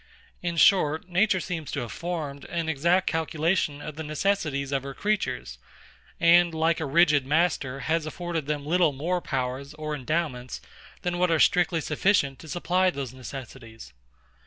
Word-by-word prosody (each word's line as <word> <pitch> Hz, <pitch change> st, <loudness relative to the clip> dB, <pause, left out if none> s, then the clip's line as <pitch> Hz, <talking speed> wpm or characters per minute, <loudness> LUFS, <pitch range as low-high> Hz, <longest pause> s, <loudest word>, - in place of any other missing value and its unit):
In 170 Hz, -1 st, -3 dB
short, 160 Hz, -2 st, +4 dB
nature 185 Hz, +2 st, +3 dB
seems 165 Hz, -5 st, -5 dB
to -, -, -1 dB
have 120 Hz, -3 st, -6 dB
formed 155 Hz, -4 st, -5 dB
an 170 Hz, -2 st, -3 dB
exact 170 Hz, +5 st, +2 dB
calculation 160 Hz, -2 st, 0 dB
of 150 Hz, -1 st, -7 dB
the 160 Hz, -, -4 dB
necessities 155 Hz, -3 st, -1 dB
of 135 Hz, -1 st, 0 dB
her 135 Hz, 0 st, -7 dB
creatures; 210 Hz, -1 st, -2 dB, 0.6 s
and, 170 Hz, -1 st, +5 dB
like 160 Hz, +1 st, +2 dB
a 160 Hz, -, -2 dB
rigid 150 Hz, -1 st, +4 dB
master, 145 Hz, -3 st, 0 dB
has 160 Hz, -1 st, 0 dB
afforded 165 Hz, -2 st, -4 dB
them 145 Hz, -1 st, -2 dB
little 170 Hz, -1 st, +3 dB
more 175 Hz, +6 st, -1 dB
powers 135 Hz, +1 st, -3 dB
or 155 Hz, 0 st, -4 dB
endowments 135 Hz, -3 st, -3 dB, 0.4 s
than 175 Hz, 0 st, -1 dB
what 180 Hz, 0 st, +3 dB
are 165 Hz, -, +3 dB
strictly 175 Hz, -1 st, +3 dB
sufficient 150 Hz, -4 st, +1 dB
to 160 Hz, -, -12 dB
supply 180 Hz, +3 st, +1 dB
those 140 Hz, -7 st, -5 dB
necessities. 120 Hz, -, -10 dB
160 Hz, 160 wpm, -26 LUFS, 140-175 Hz, 0.6 s, and